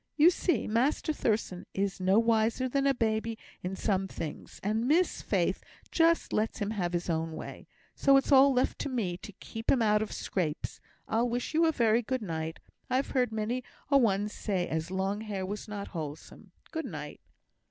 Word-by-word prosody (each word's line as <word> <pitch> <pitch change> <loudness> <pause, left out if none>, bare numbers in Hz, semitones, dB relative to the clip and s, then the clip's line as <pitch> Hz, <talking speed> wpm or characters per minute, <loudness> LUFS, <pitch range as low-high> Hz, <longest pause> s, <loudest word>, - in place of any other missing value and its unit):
You 325 +4 +7
see, 355 0 0
Master 260 +7 +1
Thurstan 215 -9 -1
is 195 0 -1
no 190 +2 +3
wiser 230 +2 +2
than 275 +2 +1
a 275 - +4
babby 225 -1 0 0.2
in 185 +2 -3
some 195 -2 0
things; 160 -4 -7
and 220 +4 0
Miss 340 +6 +2
Faith - - 0 0.3
just 335 0 +3
lets 215 +1 0
him 205 -1 -2
have 180 -5 -2
his 175 0 -1
own 165 -1 -1
way; - - -8 0.3
so 275 -1 +5
it's 270 - +1
all 275 0 +8
left 255 -1 +1
to - - -2
me 215 -9 -1
to 205 - -10
keep 225 +4 -8
him 245 -4 +4
out 210 -1 +3
of 215 - -3
scrapes. 165 -5 -3 0.3
I'll 235 +2 +1
wish 245 +5 -2
you 325 +1 +4
a - - +4
very 230 -5 +3
good 255 +1 -2
night. 160 -3 -4 0.3
I've 260 +2 0
heard 250 -4 +1
many 220 +3 -2 0.3
a 280 - +7
one 205 -4 +2
say 195 -4 -2
as 160 +1 -2
long 190 +2 -1
hair 200 -4 -3
was 205 +4 -5
not 205 -1 -5
wholesome. 155 -2 -7 0.2
Good 320 -3 -3
night." 150 - -7
220 Hz, 190 wpm, -30 LUFS, 190-255 Hz, 0.3 s, all